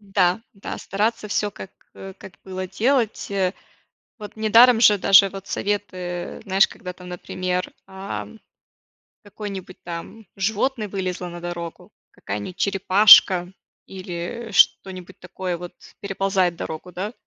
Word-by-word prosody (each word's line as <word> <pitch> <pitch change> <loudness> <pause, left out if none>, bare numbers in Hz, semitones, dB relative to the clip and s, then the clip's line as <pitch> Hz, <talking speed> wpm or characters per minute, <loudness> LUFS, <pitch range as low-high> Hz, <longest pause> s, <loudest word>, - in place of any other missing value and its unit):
Да, 180 +2 +3
да, 195 - -7
стараться 215 +2 -2
всё 205 0 -1
как, 190 - -10 0.2
э, 195 0 -10
как 185 - -12
было 185 0 -5
делать, 230 +3 0
э. 190 -1 0 0.7
Вот 210 0 -10
недаром 225 +2 +6
же 210 -3 +6
даже 195 +1 +6
вот 195 0 -10
советы, 185 -4 -4
знаешь, 195 0 +4
когда 180 -1 -9
там, 180 0 -12
например, 180 +1 -3 0.2
ам, 195 +3 -7 0.8
какое-нибудь 200 -3 -8
там 175 +6 -8
животное 220 +3 -1
вылезло 185 -2 -4
на 175 0 -9
дорогу, 170 -1 -7 0.2
какая-нибудь 105 - -6
черепашка 195 -2 +6 0.4
или, 190 +5 -6
э, - - -10
что-нибудь 185 -1 +2
такое 180 -1 -5
вот 175 0 -9 0.3
переползает 195 -3 0
дорогу, 160 +3 -7
да. 200 +5 -4
190 Hz, 130 wpm, -22 LUFS, 180-205 Hz, 0.8 s, недаром